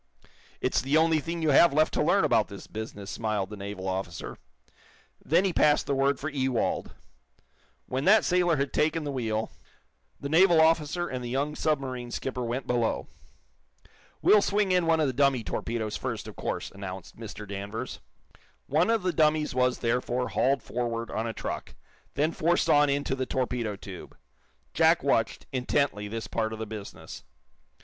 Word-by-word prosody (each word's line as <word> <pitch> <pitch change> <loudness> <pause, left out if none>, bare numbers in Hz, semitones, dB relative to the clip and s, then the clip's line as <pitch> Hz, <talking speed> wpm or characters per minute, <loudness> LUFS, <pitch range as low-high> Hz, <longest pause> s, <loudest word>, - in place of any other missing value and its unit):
"It's - - +1
the 140 +4 +2
only 160 0 +4
thing 165 +2 -4
you 155 - +3
have 165 +3 +6
left 155 +2 +3
to - - +1
learn - - +3
about - - +3
this - - -10
business," 105 -3 -7
smiled 105 0 -2
the - - -5
naval 100 -1 -6
officer. 95 -3 -4 0.8
Then 170 +6 +3
he 190 - 0
passed 150 -2 +3
the 140 - -1
word 135 0 +2
for 155 - -4
Ewald. 130 -5 -1 0.9
When 130 +3 -3
that 215 +2 +7
it - - -6
sailor 175 -2 +3
had 140 0 -2
taken 160 +1 +1
the 145 - -3
wheel, 110 -4 -2 0.7
the 140 - -4
naval 170 +2 +5
officer 160 +2 +2
and 130 -1 -5
the 120 - -4
young 140 +4 -1
submarine 130 -6 -2
skipper 125 +1 -4
went 120 +3 -3
below. 120 -2 -1 1.1
"We'll 210 - +6
swing 205 -1 +1
in 180 -2 +2
one 165 -1 +3
of 155 - +3
the 130 - -1
dummy 135 -2 +2
torpedoes, 110 -1 -3
first, - - -4
of - - -9
course," - - -4
announced 95 -2 -8
Mr. 105 -2 -8
Danvers. 100 +5 -5 0.7
One 160 +7 +2
of 225 -4 +2
the 180 -1 0
dummies 155 -1 +2
was, 125 0 +2
therefore, 125 +1 -1
hauled 130 +8 +1
forward 115 -1 -3
on 110 +2 -2
a - - -2
truck, - - -5 0.4
then 150 +3 +1
forced 170 +2 +1
on 145 0 +5
into 140 -1 0
the 130 -1 -2
torpedo 125 -5 -2
tube. 95 -2 -10 0.6
Jack - - +4
watched, - - +1
intently, 130 -4 0
this 110 0 -5
part 110 +2 -2
of - - -5
the 110 - -4
business. 105 -2 -9
130 Hz, 175 wpm, -28 LUFS, 110-155 Hz, 1.1 s, that